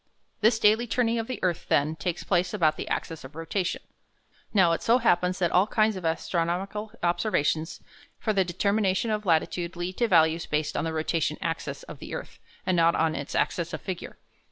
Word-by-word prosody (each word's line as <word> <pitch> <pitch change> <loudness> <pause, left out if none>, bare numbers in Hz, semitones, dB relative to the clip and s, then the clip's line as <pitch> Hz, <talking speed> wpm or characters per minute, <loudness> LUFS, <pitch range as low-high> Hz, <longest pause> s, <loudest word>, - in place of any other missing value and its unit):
This 220 +1 +4
daily 220 +2 +3
turning 235 0 +1
of 225 - -3
the 255 - -4
earth, 175 -3 -1
then, 150 +3 +2
takes 165 +2 -3
place 180 +1 +1
about 160 -6 +3
the - - -6
axis 165 -1 -3
of 130 +3 -11
rotation. 175 +3 -2 0.7
Now, 185 -5 +4
it 165 - 0
so 235 +2 +4
happens 180 -6 +2
that 175 -2 +1
all 185 +3 +4
kinds 220 -1 +2
of 185 - -6
astronomical 175 +6 -1
observations 170 -2 0 0.4
for 215 - -1
the 195 -2 +3
determination 200 +3 0
of 210 -1 -2
latitude 170 +1 +1
lead 175 +1 -4
to 240 - +2
values 165 -3 +3
based 150 -1 -1
on - - -1
the 160 - -2
rotation 155 -1 0
axis 165 -2 -4
of - - -10
the - - -6
earth, - - -8 0.3
and 185 - +2
not 170 0 +4
on 160 -1 +2
its - - -5
axis - - 0
of - - -4
figure. - - -6
180 Hz, 195 wpm, -27 LUFS, 165-210 Hz, 0.7 s, This